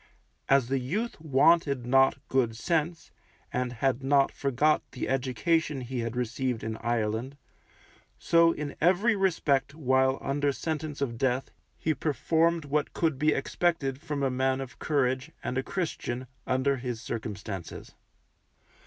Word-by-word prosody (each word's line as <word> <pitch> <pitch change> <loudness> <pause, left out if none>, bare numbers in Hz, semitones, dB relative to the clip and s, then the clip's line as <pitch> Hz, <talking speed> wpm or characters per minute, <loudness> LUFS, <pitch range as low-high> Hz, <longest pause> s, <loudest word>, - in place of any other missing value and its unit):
As 135 -3 +4
the 135 +1 0
youth 190 - -3
wanted 140 -2 +3
not 135 +2 +4
good 120 -4 +1
sense, 165 +6 -1 0.4
and 125 -1 -1
had 130 +2 0
not 140 0 +3
forgot 140 +3 +2
the 125 - -3
education 135 +3 0
he 125 0 -4
had 115 0 -3
received 125 0 -2
in 110 0 -3
Ireland, 120 +3 -2 0.8
so 165 0 +4
in 150 -3 -5
every 190 +7 +4
respect 145 -8 +1
while 130 -2 +2
under 140 +1 0
sentence 150 +1 -4
of 115 -4 -2
death 130 0 0 0.3
he 155 - 0
performed 160 +3 +1
what 145 +1 -1
could 160 -5 0
be 150 +1 +3
expected 150 -8 0
from 150 -4 -3
a 135 - +1
man 130 +1 +1
of 130 -4 -8
courage, 130 -1 0
and - - -3
a 130 - +1
Christian, 130 -7 -3 0.2
under 130 +2 +1
his 120 -2 -4
circumstances. 105 -6 -6
135 Hz, 140 wpm, -28 LUFS, 125-155 Hz, 0.8 s, As